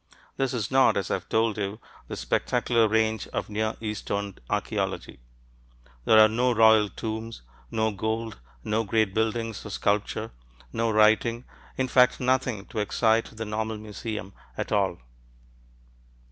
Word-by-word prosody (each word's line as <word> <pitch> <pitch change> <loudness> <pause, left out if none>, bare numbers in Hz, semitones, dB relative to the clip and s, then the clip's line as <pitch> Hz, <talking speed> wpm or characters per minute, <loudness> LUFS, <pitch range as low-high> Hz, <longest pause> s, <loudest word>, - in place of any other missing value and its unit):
This 135 -2 0
is 110 -4 -2
not, 135 0 +4
as 95 -2 -2
I've 95 -2 -3
told 110 -1 +1
you, 100 +2 -3 0.3
the - - -5
spectacular 115 - +1
range 110 0 +1
of - - -4
Near 110 +1 -1
Eastern 100 -2 -3 0.2
archeology. - - -2 0.9
There 110 - +6
are 110 0 +9
no 120 +3 +1
royal 110 -2 +6
tombs, 110 - -6 0.3
no 110 -1 0
gold, 110 - -3 0.2
no 110 +2 0
great 110 -2 +1
buildings 110 0 -1
or - - -8
sculpture, 105 +2 -1 0.4
no 115 0 0
writing, 110 +2 +3 0.3
in 130 - 0
fact 125 0 +4
nothing 125 -5 0
to 110 - -4
excite 110 +2 +2
the 110 - -4
normal 110 +1 -3
museum 105 -1 -6 0.2
at - - -4
all. 95 -4 +1
110 Hz, 140 wpm, -26 LUFS, 105-115 Hz, 0.9 s, are